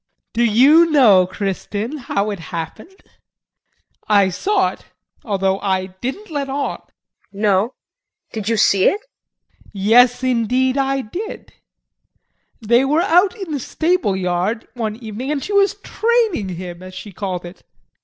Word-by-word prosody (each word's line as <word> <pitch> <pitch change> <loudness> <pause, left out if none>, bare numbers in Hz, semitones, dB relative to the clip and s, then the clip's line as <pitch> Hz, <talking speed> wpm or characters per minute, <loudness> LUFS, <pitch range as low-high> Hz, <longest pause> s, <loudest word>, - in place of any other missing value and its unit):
Do 235 - +1
you 275 +10 +5
know, 215 - +5
Kristin, 205 +7 -4
how 210 -4 -2
it 200 - -5
happened? 175 - -7 1.1
I 200 -2 +4
saw 380 - +1
it, - - -15 0.4
although 195 -5 0
I 190 -1 -2
didn't 335 - -5
let 285 -2 -3
on. 280 +1 -2
KRISTIN. - - -34 0.4
No 205 +3 +1 0.6
did 220 -2 -3
you 225 - +1
see 195 -2 +3
it? 405 - +3
JEAN. - - -32
Yes, 245 +5 +4
indeed, 255 +1 +1
I 270 -1 0
did. 375 - -7 1.1
They 235 +2 +3
were 300 +4 +2
out 365 +2 +3
in 385 -7 -7
the 290 - -2
stable 325 - 0
yard 185 +5 -1
one 220 -3 -3
evening 230 +3 -6
and 295 -2 -2
she 415 - -4
was 400 0 +3
"training" 445 - 0
him 175 0 -7
as 185 0 -10
she 205 - -8
called 185 -2 -4
it. 175 +2 -12
230 Hz, 145 wpm, -19 LUFS, 195-295 Hz, 1.1 s, you